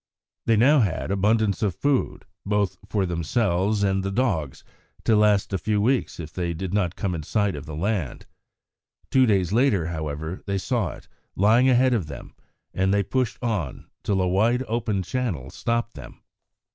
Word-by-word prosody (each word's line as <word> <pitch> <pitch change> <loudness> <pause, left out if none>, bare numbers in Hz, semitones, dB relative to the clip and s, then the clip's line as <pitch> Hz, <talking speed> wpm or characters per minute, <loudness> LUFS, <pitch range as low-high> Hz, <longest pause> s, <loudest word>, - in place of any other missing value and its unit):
They 115 - +4
now 140 +7 +5
had 95 -4 0
abundance 105 +1 +1
of 100 -5 0
food, 145 -2 0 0.2
both 105 -1 0
for 100 -1 +1
themselves 95 +4 0
and 95 -1 +1
the 95 - -2
dogs, 95 - -1 0.4
to 110 - +3
last 105 -1 +3
a 95 - 0
few 105 +4 0
weeks 120 0 0
if 80 -2 -7
they 85 -2 -2
did 95 +2 -4
not 95 -4 0
come 95 -4 -2
in 85 - -3
sight 100 +5 0
of 75 - -8
the 75 - -6
land. 90 - -2 0.9
Two 130 -1 +5
days 95 -3 +2
later, 115 -8 +3
however, 80 +1 -4
they 100 0 0
saw 110 -2 -1
it, - - -14 0.3
lying 115 +7 +4
ahead 130 0 +4
of 100 -10 -1
them, 70 - -9 0.4
and 95 +1 +1
they 100 0 +2
pushed 130 +3 -1
on 105 - -3
till 100 -2 0
a - - +1
wide, 115 +7 +2
open 110 -4 -1
channel 90 - -3
stopped 115 0 -2
them. 65 -5 -12
100 Hz, 175 wpm, -24 LUFS, 90-115 Hz, 0.9 s, now